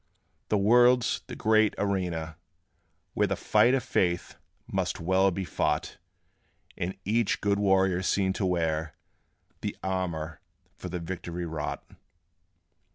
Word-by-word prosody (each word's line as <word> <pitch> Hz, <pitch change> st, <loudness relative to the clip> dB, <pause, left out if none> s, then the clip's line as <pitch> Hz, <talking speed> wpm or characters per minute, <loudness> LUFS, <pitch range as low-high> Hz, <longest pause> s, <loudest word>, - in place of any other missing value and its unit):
The 105 Hz, -, +3 dB
world's 120 Hz, +4 st, +4 dB
the -, -, -7 dB
great 110 Hz, -1 st, +3 dB
arena, 90 Hz, -5 st, -2 dB, 0.8 s
where -, -, +2 dB
The -, -, -1 dB
fight 125 Hz, +3 st, +3 dB
of 130 Hz, -, -1 dB
faith 85 Hz, -1 st, 0 dB, 0.3 s
must -, -, -2 dB
well 95 Hz, +3 st, +3 dB
be 95 Hz, +1 st, -3 dB
fought, -, -, -1 dB, 0.8 s
And 90 Hz, +2 st, -4 dB
each 110 Hz, +2 st, +1 dB
good 100 Hz, 0 st, +1 dB
warrior 95 Hz, -2 st, +3 dB
seen 95 Hz, 0 st, +1 dB
to 95 Hz, -, -2 dB
wear 80 Hz, -3 st, -1 dB, 0.7 s
The -, -, -4 dB
armor 85 Hz, -5 st, -3 dB, 0.3 s
for 90 Hz, -, -7 dB
the 90 Hz, -, -3 dB
victory 85 Hz, 0 st, -5 dB
wrought. 80 Hz, -2 st, -4 dB
95 Hz, 125 wpm, -28 LUFS, 85-100 Hz, 0.8 s, world's